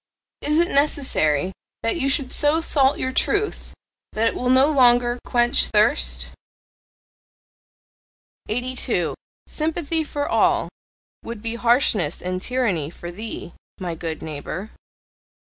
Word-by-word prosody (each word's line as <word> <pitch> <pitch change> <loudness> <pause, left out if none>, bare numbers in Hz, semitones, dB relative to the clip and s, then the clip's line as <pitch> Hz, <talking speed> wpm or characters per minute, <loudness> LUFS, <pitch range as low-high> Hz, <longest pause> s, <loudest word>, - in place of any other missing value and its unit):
Is 300 +1 0
it 345 +2 +3
necessary 190 - +1 0.3
that 230 - +1
you 275 -5 +1
should 270 -1 +1
so 295 +2 +3
salt 280 -4 +2
your 260 - -2
truth 410 +10 -1 0.4
that 220 +1 +1
it - - -6
will 250 - -2
no 260 +1 +5
longer 245 -4 +3
quench 240 0 +3
thirst? 60 - +3 2.2
82. 245 +3 -1 0.3
"Sympathy 320 0 -1
for 290 -1 -4
all" - - +2 0.5
would 230 -2 -8
be 230 0 -2
harshness 235 - +1
and 185 0 -4
tyranny 205 - -1
for 175 +1 -9
THEE, 210 -2 -8 0.3
my 180 -3 -4
good 165 -1 -6
neighbour. 160 +7 -6
240 Hz, 120 wpm, -22 LUFS, 185-280 Hz, 2.2 s, no